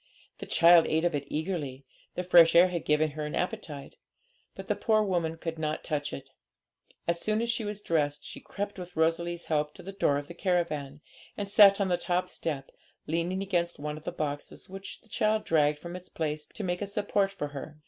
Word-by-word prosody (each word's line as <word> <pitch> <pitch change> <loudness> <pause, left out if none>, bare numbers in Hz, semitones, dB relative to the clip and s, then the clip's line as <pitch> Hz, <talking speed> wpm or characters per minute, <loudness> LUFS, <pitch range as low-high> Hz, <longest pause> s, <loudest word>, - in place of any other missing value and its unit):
The - - -7
child 170 0 +6
ate 160 +2 +1
of 175 - +2
it 145 -1 -2
eagerly 150 -5 -3 0.3
the 180 - -2
fresh 170 -2 +7
air 175 +2 +8
had 170 -3 -3
given 150 0 +2
her 150 +1 -5
an 150 - -4
appetite 175 -8 -4 0.6
but - - -8
the - - +2
poor 215 -2 +2
woman 170 -5 -1
could 165 -1 -5
not 155 0 -2
touch 145 -2 -2
it. 135 0 -8 0.8
As 170 0 +1
soon 215 0 +1
as 235 +1 +1
she 235 -1 -2
was 205 0 -4
dressed, 145 -3 0
she - - -7
crept, 205 -1 -5
with 180 0 -9
Rosalie's 170 +1 0
help, 150 -1 -1
to - - -12
the 195 - -6
door 170 -7 +1
of 145 0 -5
the 170 - -8
caravan, 160 -6 -1 0.4
and 205 - -3
sat 200 0 +7
on 195 -2 +1
the 175 - +2
top 180 +1 -1
step, 145 -4 -4 0.3
leaning 170 +4 -1
against 175 -3 -1
one 150 +1 -4
of 155 - -10
the - - -3
boxes, 145 -1 -5
which 195 +1 -9
the - - -24
child 215 0 +1
dragged 150 -2 +3
from 170 +3 -8
its 180 0 -8
place 150 -1 -3
to 215 - -7
make 180 0 -2
a 205 - -2
support 200 0 0
for 150 -7 -4
her. 145 +2 -8
170 Hz, 215 wpm, -29 LUFS, 150-190 Hz, 0.8 s, air